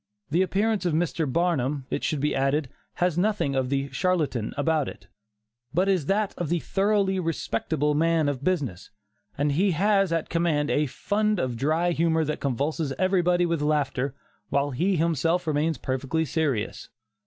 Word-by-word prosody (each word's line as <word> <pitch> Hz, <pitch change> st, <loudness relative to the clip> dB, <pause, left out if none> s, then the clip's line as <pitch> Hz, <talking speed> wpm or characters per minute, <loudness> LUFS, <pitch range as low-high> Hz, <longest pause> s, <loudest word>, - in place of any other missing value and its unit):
The 170 Hz, +4 st, +3 dB
appearance 205 Hz, +2 st, +1 dB
of 160 Hz, -, 0 dB
Mr. 160 Hz, -3 st, 0 dB
Barnum, 145 Hz, -4 st, 0 dB
it -, -, -2 dB
should 150 Hz, -3 st, -1 dB
be 150 Hz, -, +1 dB
added, 135 Hz, +1 st, +1 dB, 0.3 s
has 175 Hz, -1 st, +1 dB
nothing 200 Hz, -8 st, +1 dB
of 130 Hz, -1 st, 0 dB
the 140 Hz, 0 st, 0 dB
'charlatan' 155 Hz, -, 0 dB
about 155 Hz, -1 st, +1 dB
it, -, -, -12 dB, 0.7 s
but 185 Hz, +3 st, +3 dB
is 185 Hz, -7 st, +1 dB
that 205 Hz, +1 st, +1 dB
of 175 Hz, -4 st, -2 dB
the 175 Hz, -, +2 dB
thoroughly 195 Hz, +1 st, +1 dB
respectable 150 Hz, -3 st, -1 dB
man 165 Hz, 0 st, +2 dB
of 140 Hz, -2 st, -2 dB
business; 140 Hz, -, -1 dB, 0.5 s
and 145 Hz, +1 st, +1 dB
he 185 Hz, +6 st, +2 dB
has 195 Hz, +1 st, +2 dB
at 165 Hz, -1 st, 0 dB
command 160 Hz, -3 st, +1 dB
a 150 Hz, 0 st, +2 dB
fund 210 Hz, -, 0 dB
of 130 Hz, -7 st, -1 dB
dry 160 Hz, +8 st, +1 dB
humor 160 Hz, -1 st, +1 dB
that 150 Hz, -, -3 dB
convulses 140 Hz, +3 st, -1 dB
everybody 180 Hz, -2 st, +2 dB
with 165 Hz, -3 st, -1 dB
laughter, 140 Hz, -3 st, 0 dB, 0.3 s
while 140 Hz, +1 st, +1 dB
he 180 Hz, +9 st, +1 dB
himself 165 Hz, +2 st, +1 dB
remains 155 Hz, 0 st, 0 dB
perfectly 135 Hz, +6 st, -1 dB
serious. 140 Hz, -7 st, -2 dB
160 Hz, 165 wpm, -26 LUFS, 140-180 Hz, 0.7 s, The